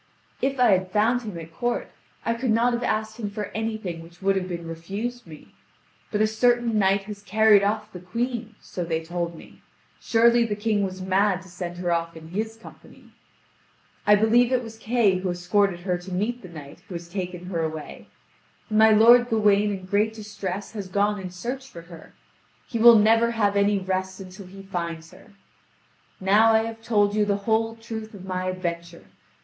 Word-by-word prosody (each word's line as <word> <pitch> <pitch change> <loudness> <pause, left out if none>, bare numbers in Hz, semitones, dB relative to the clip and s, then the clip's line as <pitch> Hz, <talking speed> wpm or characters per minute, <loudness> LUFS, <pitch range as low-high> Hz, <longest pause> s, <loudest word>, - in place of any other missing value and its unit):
"If 270 0 0
I 245 -3 +5
had 185 -1 +2
found 220 +5 +2
him 210 -7 -7
at 165 0 -9
court, 240 +5 -2 0.3
I 230 - +1
could 235 +2 -3
not 235 +2 +3
have 240 - -1
asked 220 -1 -2
him 210 -3 -3
for 210 0 -5
anything 220 -6 -4
which 170 +1 -15
would 195 0 +1
have 185 -1 -1
been 170 -2 -5
refused 200 +8 -5
me; 155 -2 -13 0.6
but 210 - 0
a - - +5
certain 235 0 +2
knight 195 0 +2
has 205 0 -9
carried 210 +1 +5
off 210 +1 -1
the 180 - -7
Queen, 230 +4 -4
so 180 - -6
they 165 -1 -2
told 170 0 -4
me; - - -15 0.4
surely 235 +1 +4
the 215 -3 -2
King 210 0 0
was 185 -1 -4
mad 190 0 +1
to 190 - -15
send 175 0 -6
her 175 -1 -2
off 170 -1 -1
in 160 0 -11
his 220 +5 -3
company. 225 - -16 1.0
I 210 - +8
believe 230 +4 +3
it 250 -1 +1
was 225 -1 -9
Kay 220 -5 +2
who 185 0 -2
escorted 175 +1 +1
her 180 -1 -1
to 180 +2 -10
meet 220 +7 -2
the 185 - -11
knight 155 0 -11
who 185 - -8
has 170 0 -7
taken 180 -1 -5
her 175 -3 -2
away; 160 -1 -6 0.6
and 215 - +3
my 220 0 +7
lord 235 +3 +6
Gawain 210 -2 +3
in 195 -2 -5
great 205 +3 +1
distress 205 -2 -6
has 205 -4 -6
gone 205 +2 0
in 185 -1 -6
search 245 +9 -6
for 170 - -11
her. 170 -1 -14 0.5
He 230 - -3
will 235 0 +9
never 225 +2 +4
have 210 -3 +1
any 200 0 +3
rest 190 0 -3
until 190 0 -10
he 195 +1 -12
finds 170 -4 -5
her. - - -17 0.9
Now 210 +4 +4
I 220 0 +4
have 225 0 -6
told 205 -3 +2
you 210 0 +2
the 205 -1 +1
whole 225 0 +1
truth 220 -1 -8
of 190 -1 -10
my 185 -1 -3
adventure. 170 -2 -5
205 Hz, 200 wpm, -24 LUFS, 180-225 Hz, 1.0 s, will